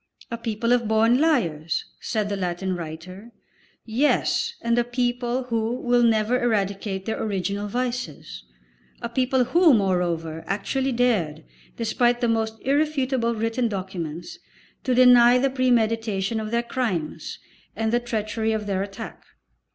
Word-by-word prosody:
"A 235 - -2
people 230 +1 0
of 240 -2 +1
born 225 +3 +3
liars," 170 - +1
said 215 -3 -2
the 205 - -2
Latin 185 0 -2
writer. 175 +6 -8 0.5
Yes, 245 +6 +1
and 235 0 +2
a - - +3
people 245 +1 -1
who 230 -1 -1
will 245 0 +2
never 230 +1 +2
eradicate 200 -4 -1
their 220 - -3
original 200 0 -2
vices, 250 +3 -4 0.6
a 235 - -2
people 255 +1 +2
who, 320 +3 +5
moreover, 175 -5 -1
actually 265 +7 -1
dared, 205 -11 0 0.3
despite 240 +1 +1
the 240 - +1
most 225 -1 0
irrefutable 270 -4 +1
written 225 +2 0
documents, 185 -5 -5 0.5
to 255 -2 +2
deny 245 -1 +7
the 270 +1 +1
premeditation 225 -5 +1
of 215 -1 -4
their 235 +1 0
crimes 220 - -3 0.4
and 225 0 -1
the 240 - +4
treachery 220 -1 -2
of 215 -1 -2
their 195 -2 -1
attack. 195 0 -7
225 Hz, 135 wpm, -24 LUFS, 195-245 Hz, 0.6 s, deny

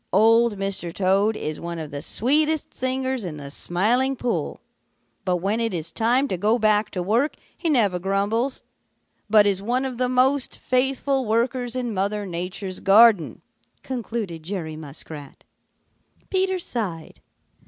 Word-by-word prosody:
Old 225 0 +4
Mr. 195 -3 -2
Toad 200 +4 +2
is 155 0 -4
one 170 0 -5
of 155 -2 -6
the 145 0 -5
sweetest 300 - +1
singers 260 -1 -2
in 165 -5 -5
the 140 -1 -7
Smiling 235 - +1
Pool, 245 -1 -2 0.7
but 180 -1 +2
when 195 +6 -1
it 230 -4 -1
is 165 -1 -3
time 245 +5 +2
to 185 - -2
go 215 +5 +3
back 215 -1 +2
to 180 - -3
work 235 - +1 0.2
he 335 - -1
never 210 - +3
grumbles, 205 +7 0 0.7
but 210 -1 +6
is 195 -2 +1
one 245 +5 0
of 255 -2 -5
the 250 -1 +1
most 255 +2 +2
faithful 265 +1 0
workers 240 +2 0
in 245 -3 -2
Mother 205 +2 -1
Nature's 180 +1 -5
garden," 205 -2 +5 0.4
concluded 225 -9 -4
Jerry 160 -2 -5
Muskrat. 150 -1 -9 0.9
Peter 380 0 +1
sighed. 205 - -4
215 Hz, 145 wpm, -23 LUFS, 185-255 Hz, 0.9 s, but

